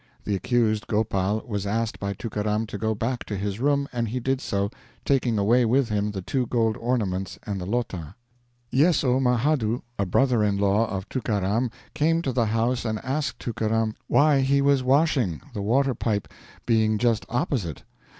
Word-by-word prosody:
The 105 - -2
accused 110 0 +1
Gopal 105 -1 0
was 100 -3 -3
asked 110 +2 -1
by 100 0 -2
Tookaram 105 +1 -2
to 100 - -5
go 110 +1 0
back 120 +4 -2
to 100 - -4
his 100 +1 -3
room, 140 +1 +1
and 120 -1 -1
he 125 +4 -2
did 130 +2 -1
so, 100 -3 -1 0.3
taking 125 -5 +2
away 115 +5 +4
with 120 +2 +2
him 105 0 0
the 95 -3 -5
two 125 +4 -1
gold 115 -2 +1
ornaments 100 -7 -1
and 100 -2 -3
the 90 - -5
'lota'. 100 -7 -3 0.6
Yesso 140 -3 +3
Mahadhoo, 125 -2 +1 0.2
a 100 - +1
brother 125 +3 +3
in 100 -1 +1
law 100 +3 +2
of 95 -1 -4
Tookaram, 110 -1 0 0.2
came 165 +2 +1
to 135 - 0
the 120 -3 +1
house 115 +3 0
and 110 -2 -1
asked 135 +3 -1
Tookaram 110 -1 -1
why 145 -1 +4
he 140 +1 +3
was 140 -1 +3
washing, 130 - +2
the 105 - -4
water 130 +6 +2
pipe 105 -4 -1 0.4
being 110 -2 +2
just 115 -1 +1
opposite. 120 - -2
115 Hz, 175 wpm, -25 LUFS, 105-130 Hz, 0.6 s, away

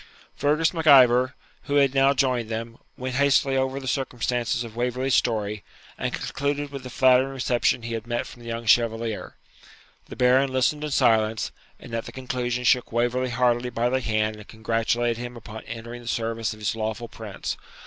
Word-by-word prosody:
Fergus 155 +4 +2
Mac 165 -2 -3
Ivor, 130 -2 +6 0.3
who 145 - -1
had 140 -2 +4
now 135 0 +4
joined 125 -4 +1
them, 115 +1 -5 0.2
went 130 0 -4
hastily 140 -1 +3
over 130 +1 0
the 135 - -8
circumstances 125 -2 -1
of 115 -2 -10
Waverley's 125 +2 -1
story, 105 -4 0 0.3
and - - -3
concluded 145 0 -3
with 140 -1 -6
the 125 - -8
flattering 130 +1 +4
reception 125 -2 0
he 115 0 -4
had 115 0 -5
met 120 0 -1
from 120 - -12
the 120 - -11
young 115 0 -4
Chevalier. 115 -1 +1 0.7
The - - -9
Baron 130 +2 +3
listened 130 +4 +1
in 150 - -2
silence, 110 -5 +2 0.3
and 120 - -12
at 115 0 -2
the - - -8
conclusion 125 -1 -3
shook 125 0 +3
Waverley 120 +2 0
heartily 120 0 +1
by 120 0 0
the 130 +1 0
hand 110 -2 0
and 105 - -12
congratulated 115 +1 0
him 120 0 -6
upon 110 -1 -9
entering 115 +1 -7
the 120 - -13
service 115 -1 -1
of 110 - -8
his 110 +1 -2
lawful 110 +1 -3
Prince. 110 -3 -6
120 Hz, 185 wpm, -25 LUFS, 115-130 Hz, 0.7 s, Ivor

